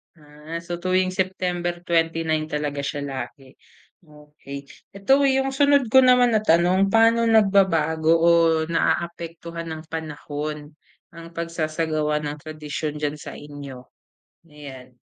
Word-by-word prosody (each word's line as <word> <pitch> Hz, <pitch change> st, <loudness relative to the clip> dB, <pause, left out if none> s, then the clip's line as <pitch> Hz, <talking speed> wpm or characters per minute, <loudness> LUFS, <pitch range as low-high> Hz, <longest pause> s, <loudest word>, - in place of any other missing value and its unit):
Ah. 150 Hz, +2 st, -9 dB
So, 175 Hz, 0 st, -5 dB
tuwing 185 Hz, +1 st, +1 dB
September 180 Hz, -2 st, -2 dB
29 165 Hz, -2 st, 0 dB
talaga 150 Hz, -2 st, -3 dB
siya 140 Hz, +1 st, -3 dB
lagi, 135 Hz, 0 st, -7 dB, 0.5 s
okey. 150 Hz, -3 st, -12 dB, 0.3 s
Ito, 265 Hz, +8 st, +3 dB
yung 270 Hz, 0 st, +1 dB
sunod 280 Hz, -3 st, +3 dB
ko 265 Hz, -, +8 dB
naman 250 Hz, -2 st, +5 dB
na 220 Hz, -, +3 dB
tanong, 185 Hz, 0 st, +3 dB
paano 230 Hz, +2 st, +4 dB
nagbabago 165 Hz, -7 st, +3 dB
o 170 Hz, -, +6 dB, 0.3 s
naaapektuhan 170 Hz, 0 st, -3 dB
ng 160 Hz, -1 st, -6 dB
panahon 150 Hz, -1 st, -6 dB, 0.4 s
ang 165 Hz, 0 st, -11 dB
pagsasagawa 155 Hz, -2 st, -2 dB
ng 150 Hz, 0 st, -5 dB
tradisyon 150 Hz, 0 st, -5 dB
diyan 150 Hz, 0 st, -2 dB
sa -, -, -9 dB
inyo? 140 Hz, -3 st, -10 dB, 0.7 s
Ayan. 130 Hz, -4 st, -12 dB
165 Hz, 120 wpm, -23 LUFS, 150-185 Hz, 0.7 s, ko